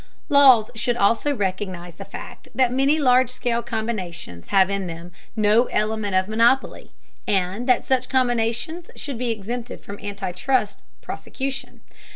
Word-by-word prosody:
Laws 265 -7 +6
should 235 +1 -1
also 230 +7 +2
recognize 185 -4 -3
the - - -10
fact - - -10
that 255 -2 +3
many 275 +4 +3
large 255 -3 +4
scale 240 -2 -1
combinations 190 - -5
have 195 -2 +4
in 195 -1 -2
them 170 +1 -8 0.2
no 215 +2 +4
element 215 -3 -1
of 185 0 +2
monopoly, 230 +5 +1 0.4
and 195 +5 0
that 250 - +3
such 255 -1 +1
combinations 245 +5 0
should 275 -5 -6
be 250 -1 -1
exempted 230 +3 -4
from 200 0 -9
anti 200 -2 -4
trust 210 +4 0 0.2
prosecution. 270 -1 -5
230 Hz, 145 wpm, -23 LUFS, 200-255 Hz, 0.4 s, Laws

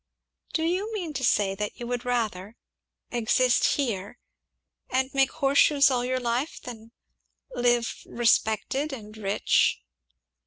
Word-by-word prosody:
"Do 320 - 0
you 370 +6 -1
mean 345 -7 -4
to 265 -2 -4
say 205 -5 +2
that 210 +1 -5
you 240 - -5
would 245 +1 -3
rather 220 -4 -2 0.6
exist 245 +1 +2
here, 225 -6 -3 0.7
and 260 +1 0
make 270 -1 +3
horseshoes 280 -1 +4
all 245 -1 0
your 255 +1 -1
life, 245 +5 -2
than 230 -2 -10 0.6
live, 240 -1 +1
respected, 240 +5 +1
and 215 -4 -9
rich." 205 -2 +1
245 Hz, 125 wpm, -26 LUFS, 220-270 Hz, 0.7 s, horseshoes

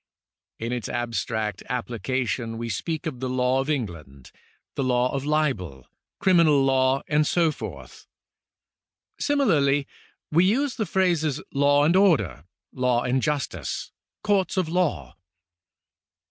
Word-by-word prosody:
In 115 +1 -4
its 120 -4 -3
abstract 115 -3 -2
application 120 -1 -2
we 115 0 -4
speak 155 - -3
of 145 -6 -4
the 130 0 -3
law 130 +1 +1
of 135 +2 -2
England, 85 - -5 0.4
the - - -2
law 125 0 +1
of 140 0 -2
libel, 120 - -1 0.3
criminal 165 -7 +4
law, 130 0 +2
and 150 0 +2
so 170 -3 +2
forth. - - -9 1.1
Simi 285 -1 +1
larly 145 - +3 0.5
we 165 +3 +4
use 250 +8 +2
the 220 -4 -1
phrases 165 -6 +1
law 145 +1 +4
and 165 +4 +3
order, 105 - +2 0.3
law 125 -1 +1
and 125 +1 +1
justice, 135 - -3 0.3
courts 200 -3 +1
of 185 -3 +1
law. 150 - -1
135 Hz, 130 wpm, -25 LUFS, 120-160 Hz, 1.1 s, criminal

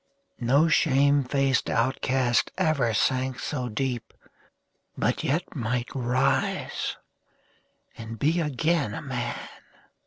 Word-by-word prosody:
No 135 +7 +3
shame 140 -2 +3
faced 135 0 +1
outcast 130 0 +1
ever 155 -10 +2
sank 130 +3 +1
so 125 -3 -3
deep, 120 +1 -3 0.8
But - - 0
yet 165 +6 -1
might 120 -1 -2
rise 130 +1 0 1.0
and 115 0 -8
be 155 +8 +2
again 150 -5 0
a - - -6
man 125 -4 -3
130 Hz, 100 wpm, -26 LUFS, 120-145 Hz, 1.0 s, No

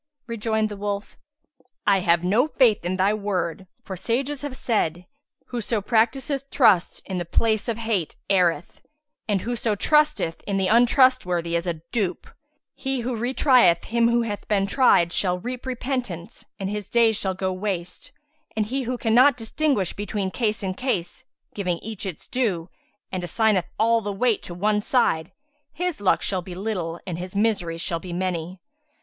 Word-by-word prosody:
Rejoined 220 -2 -1
the 205 - -7
wolf, 205 0 -4 0.7
"I 200 -1 +4
have 170 -1 +2
no 215 +10 +3
faith 245 - +3
in 180 +2 -1
thy 195 +2 +3
word, 190 -3 -2 0.2
for 190 - -6
sages 260 +9 -2
have 285 -3 -5
said, 180 -7 -1 0.4
'Whoso 235 -2 -1
practiseth 265 +6 0
trust 210 -9 +3
in 190 - -4
the 175 - -1
place 220 +6 +1
of 225 - -1
hate, 220 -8 -1
erreth;' 175 -4 +1 0.5
and, 200 -3 +1
'Whoso 230 -1 -1
trusteth 300 - +2
in 200 -1 0
the 190 - +1
untrustworthy 235 -8 +3
is 170 +1 -1
a 165 -2 -3
dupe; 195 -7 -1 0.5
he 270 -2 -2
who 245 +1 -2
re 240 +3 -1
trieth 245 - +4
him 235 0 +2
who 235 0 +2
hath 210 -3 -5
been 200 -2 +2
tried 195 -6 +4
shall 180 -2 +1
reap 250 +7 -6
repentance 250 -9 -4
and 195 - -3
his 210 0 -4
days 230 -2 +4
shall 190 -2 -1
go 185 0 -1
waste; 185 -2 -4 0.4
and 215 -1 +1
he 265 +6 -2
who 250 0 -3
cannot 245 +4 +4
distinguish 230 - 0
between 200 -1 -3
case 215 -2 -1
and 185 0 -3
case, 250 -2 -2 0.3
giving 180 -4 -1
each 215 +1 -5
its 180 - -6
due, 195 -10 -1 0.4
and 185 - -3
assigneth 200 +1 +2
all 230 +1 +3
the 205 -1 -3
weight 220 +2 +1
to 175 - -8
one 210 +3 +1
side, 170 -9 +1 0.4
his 355 - -3
luck 195 - +2
shall 190 -2 -1
be 175 0 -9
little 180 -4 -3
and 175 -2 -4
his 180 +2 -7
miseries 195 -6 0
shall 170 -1 -1
be 180 +1 -8
many.' 180 0 -3
205 Hz, 170 wpm, -24 LUFS, 180-235 Hz, 0.7 s, I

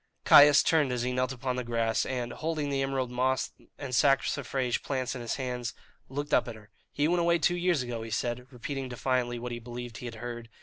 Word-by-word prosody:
Caius 145 0 +8
turned 150 -5 +3
as 125 -1 -1
he 125 - -1
knelt 125 0 0
upon 125 0 -3
the 125 - -2
grass, 115 -1 0
and, 125 -2 -3
holding 155 -2 -2
the 135 -1 0
emerald 135 -2 -1
moss 130 +1 0 0.3
and 135 -3 -6
saxifrage 135 0 +1
plants 130 -3 -2
in 125 - -6
his 120 - -2
hand, 125 -2 -3 0.4
looked 145 +2 -4
up - - +4
at 120 - -6
her. 105 -1 -16 0.2
"He 145 +1 +1
went 175 +1 +2
away 170 0 +3
two 175 +2 +2
years 175 -5 +1
ago," 120 -2 -4
he 115 - -6
said, 120 +2 -2
repeating 130 +1 -5
defiantly 125 0 -1
what 120 +1 -5
he 120 - -4
believed 120 0 -7
he 125 - -6
had 115 - -7
heard. 120 0 -7
125 Hz, 220 wpm, -29 LUFS, 120-140 Hz, 0.4 s, Caius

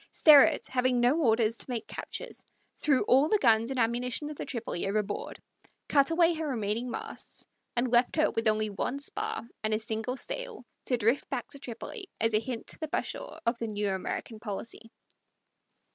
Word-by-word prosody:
Sterrett, 295 -3 +7
having 255 -1 +1
no 245 +4 +4
orders 225 -3 +2
to - - -6
make 240 -3 -3
captures, - - -6 0.4
threw 280 -4 +3
all 270 +5 +4
the 425 - +4
guns 230 - +4
and 265 -1 -2
ammunition 245 +5 0
of - - -7
the - - -5
Tripoli 225 -7 -3
overboard, 205 0 -2 0.5
cut 280 -2 +4
away 335 +1 +4
her 320 -1 -3
remaining 230 -1 -1
masts, - - -5 0.3
and 240 0 +1
left 240 0 +3
her 310 -1 +3
with 225 0 -1
only 215 0 +2
one 250 +6 -2
spar 425 - -4 0.2
and 215 0 +1
a - - +1
single 225 +3 -3
sail - - -6 0.2
to 250 - +1
drift 230 +4 +1
back - - -3
to 280 - -10
Tripoli, 320 - -7
as 225 0 +1
a 215 - +4
hint 235 0 -5
to - - -6
the 315 - -3
Bashaw - - -3
of 235 +1 +1
the 230 - -2
new 205 -2 -1
American 205 +3 -4
policy. 225 +1 -6
240 Hz, 185 wpm, -29 LUFS, 220-280 Hz, 0.5 s, Sterrett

